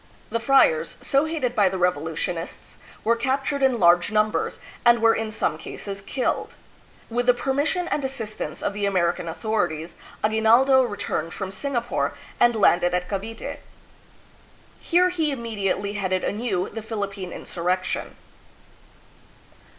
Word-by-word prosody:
The 230 - 0
friars, 230 - +3
so 275 +2 +2
hated 295 -7 -2
by 205 -4 +4
the 190 - -3
revolution 165 -1 0
ists, 165 0 -8 0.2
were 230 +2 +3
captured 270 +3 -1
in 260 -3 +3
large 175 +1 +5
numbers 215 0 +1 0.3
and 240 0 +6
were 225 0 +5
in 225 -1 -2
some 165 -7 -1
cases 200 +3 -6
killed. 255 +6 -2 0.5
With 245 +1 -1
the 250 - +6
permission 285 +8 0
and 295 - -1
assistance 235 -5 -4
of - - -1
the 205 0 -1
American 175 -3 0
authorities, 165 -2 -2 0.3
Aguinaldo 230 +5 +5
returned 205 -8 -3
from 190 -2 -4
Singapore, 240 +2 -2 0.2
and 240 -1 +5
landed 175 -4 +4
at 180 0 -1
Cavite. 215 +3 -5 1.2
Here 360 +2 +3
he 325 -4 0
immediately 205 -6 -2
headed 185 -2 -1
anew 205 -4 -1
the 225 - -6
Philippine 200 -4 -4
insurrection. 180 +2 -2
215 Hz, 135 wpm, -24 LUFS, 185-245 Hz, 1.2 s, and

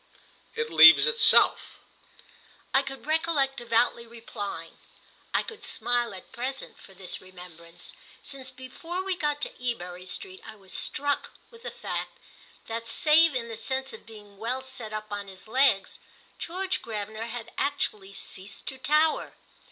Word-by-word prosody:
"It 460 0 -2
leaves - - +10
itself!" 460 -2 +5 1.0
I 270 - +5
could 270 0 -8
recollect 310 -3 +1
devoutly 235 0 +1
replying. 205 -7 -7 0.5
I - - +1
could 450 -1 -10
smile 240 -1 +1
at 185 - -12
present 265 +2 -5
for 195 - -15
this 185 -1 -3
remembrance, 180 -2 -13 0.3
since 270 -2 -4
before 265 +8 -6
we 380 -1 -1
got 295 -4 -1
to - - -3
Ebury 180 -6 -4
Street 375 - -2
I 220 - -10
was 195 -3 -6
struck 285 0 +1 0.2
with 465 -1 -15
the - - -5
fact - - -5 0.5
that, 230 0 -5
save 305 +4 +5
in 235 -2 -2
the 225 - -6
sense 265 +3 -3
of 220 - -12
being 205 -3 -13
well 250 +4 -2
set 260 -5 -6
up 215 0 -6
on 205 -1 -4
his 190 +1 -12
legs, 245 -4 +2 0.4
George 375 +2 -2
Gravener 215 0 -5
had 235 -1 -7
actually 210 -9 -1
ceased 195 0 -7
to 265 - -7
tower. 305 +4 +2
240 Hz, 150 wpm, -27 LUFS, 210-290 Hz, 1.0 s, leaves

